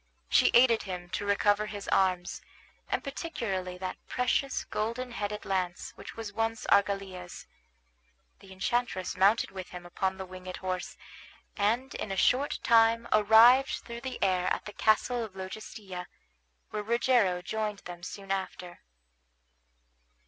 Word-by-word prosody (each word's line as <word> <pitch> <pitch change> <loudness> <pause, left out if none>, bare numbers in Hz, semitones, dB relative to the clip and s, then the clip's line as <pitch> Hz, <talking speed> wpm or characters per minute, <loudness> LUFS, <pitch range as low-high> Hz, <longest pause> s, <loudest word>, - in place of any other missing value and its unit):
She - - +5
aided 235 -2 +6
him 180 -2 -6
to 200 +2 -3
recover 205 +1 +2
his 205 -1 -7
arms, 185 -2 +1 0.5
and - - -1
particularly 200 - -4
that 185 0 -5
precious 250 +2 0
golden 235 +4 -3
headed 210 -2 -4
lance 180 -2 -2
which - - -11
once 225 -2 -6
was 225 0 -1
Argalia's. 195 -3 0 0.9
The 195 -1 -15
enchantress 190 0 -1
mounted 200 +5 +3
with 190 -1 -7
him 180 -1 -9
upon 190 +2 -2
the 190 - -5
winged 185 0 -8
horse, 185 -1 -4 0.6
and 230 +6 0
in 205 - -4
a 195 - -3
short 265 +9 +2
time 230 0 +4
arrived 225 +5 +6
through 235 0 -7
the 260 0 -5
air 185 -2 +2
at - - -1
the 210 - -7
castle 230 +2 +2
of 210 -4 -8
Logestilla, 190 -1 -7 0.6
where 210 - -2
Rogero 225 -5 +2
joined 210 +1 -3
them 175 -1 -8
soon 195 +2 -7
after. 185 -2 -4
205 Hz, 140 wpm, -29 LUFS, 185-230 Hz, 0.9 s, aided